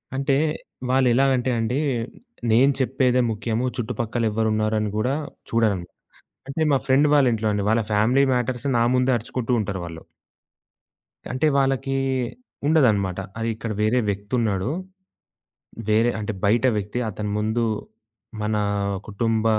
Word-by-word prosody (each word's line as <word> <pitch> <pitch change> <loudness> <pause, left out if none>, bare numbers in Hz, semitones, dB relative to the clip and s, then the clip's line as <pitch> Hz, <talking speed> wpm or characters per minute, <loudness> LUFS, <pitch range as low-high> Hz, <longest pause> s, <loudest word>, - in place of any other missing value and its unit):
అంటే, 135 0 +1 0.5
వాళ్ళెలాగంటే 130 0 +3
అండీ. 115 +4 0 0.7
నేను 130 +5 +5
చెప్పేదే 130 -1 +2
ముఖ్యము, 110 +2 -2
చుట్టుపక్కలెవరున్నారని 110 -2 0
గూడా 125 +5 +1 0.3
చూడరండి. 105 -6 +1 0.6
అంటే 140 +4 -3
మా - - +5
ఫ్రెండ్ 135 +3 +4
వాళ్ళ 145 -2 +5
ఇంట్లోండి 105 -2 0
వాళ్ళ 115 +1 +3
ఫ్యామిలీ 115 +6 +3
మ్యాటర్స్ 125 +1 -1
నా 115 - +3
ముందే 125 +1 +2
అరుచుకుంటూ 125 +1 -4
ఉంటారు 100 -2 -3
వాళ్ళు. 80 -1 -8 1.3
అంటే 130 +5 +1
వాళ్ళకి 135 0 +1 0.7
ఉండదన్నమాట. 105 - +3 0.2
అది 115 0 -1
ఇక్కడ 110 +1 -5
వేరే 110 +4 +3
వ్యక్తున్నాడు. 100 0 -1 1.2
వేరే 115 +3 +3
అంటే 110 +1 -3
బయట 115 +5 +3
వ్యక్తి. 105 +4 -3
అతని 105 0 -4
ముందు 110 +3 0 0.8
మన 105 0 0 0.5
కుటుంబ 110 +1 0
115 Hz, 115 wpm, -23 LUFS, 105-130 Hz, 1.3 s, నేను